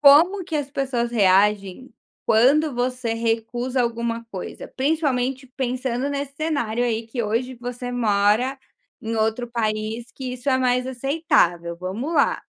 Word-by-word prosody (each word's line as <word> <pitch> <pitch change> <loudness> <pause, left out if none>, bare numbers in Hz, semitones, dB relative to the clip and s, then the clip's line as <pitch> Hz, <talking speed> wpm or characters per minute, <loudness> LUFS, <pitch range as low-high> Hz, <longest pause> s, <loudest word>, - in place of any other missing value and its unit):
Como 330 +7 +6
que 325 -3 -2
as 285 -2 -2
pessoas 255 -4 -1
reagem 200 +2 +2 0.3
quando 275 +6 +4
você 245 -1 -1
recusa 230 +3 -1
alguma 235 0 -2
coisa? 185 - -6
Principalmente 270 -3 0
pensando 255 0 -1
nesse 280 -1 -4
cenário, 280 -8 -1
aí, 230 -1 -1
que 235 +1 -3
hoje 230 +4 -1
você 245 +1 -6
mora 220 +3 +2 0.4
em 225 +1 -3
outro 225 +2 0
país 220 0 -2
que 260 -2 -5
isso 250 +2 -5
é 260 - +3
mais 250 0 +2
aceitável, 245 - +1
vamos 195 - -4
lá. 285 - +2
245 Hz, 140 wpm, -23 LUFS, 225-270 Hz, 0.4 s, Como